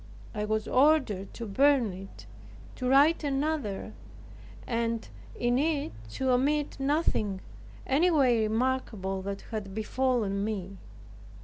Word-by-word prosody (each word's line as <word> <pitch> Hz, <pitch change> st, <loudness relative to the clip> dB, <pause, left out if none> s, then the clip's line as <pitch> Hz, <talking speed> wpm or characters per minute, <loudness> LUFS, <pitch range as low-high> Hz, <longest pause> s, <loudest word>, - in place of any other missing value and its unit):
I 210 Hz, -1 st, -2 dB
was 215 Hz, 0 st, -1 dB
ordered 260 Hz, -9 st, +2 dB
to 235 Hz, -, -5 dB
burn 255 Hz, 0 st, +3 dB
it, 195 Hz, +2 st, -11 dB, 0.5 s
to 250 Hz, -1 st, -1 dB
write 290 Hz, +5 st, +5 dB
another, 275 Hz, -8 st, -2 dB, 0.7 s
and 230 Hz, -1 st, -1 dB, 0.3 s
in 245 Hz, +1 st, +1 dB
it 295 Hz, -1 st, 0 dB, 0.2 s
to 265 Hz, -1 st, 0 dB
omit 285 Hz, +3 st, +1 dB
nothing 270 Hz, -, 0 dB, 0.5 s
anyway 275 Hz, -5 st, +3 dB
remarkable 220 Hz, -5 st, -1 dB
that 195 Hz, +1 st, -5 dB
had 200 Hz, -3 st, -5 dB
befallen 220 Hz, -3 st, 0 dB
me. 195 Hz, -3 st, -4 dB
240 Hz, 110 wpm, -29 LUFS, 210-275 Hz, 0.7 s, write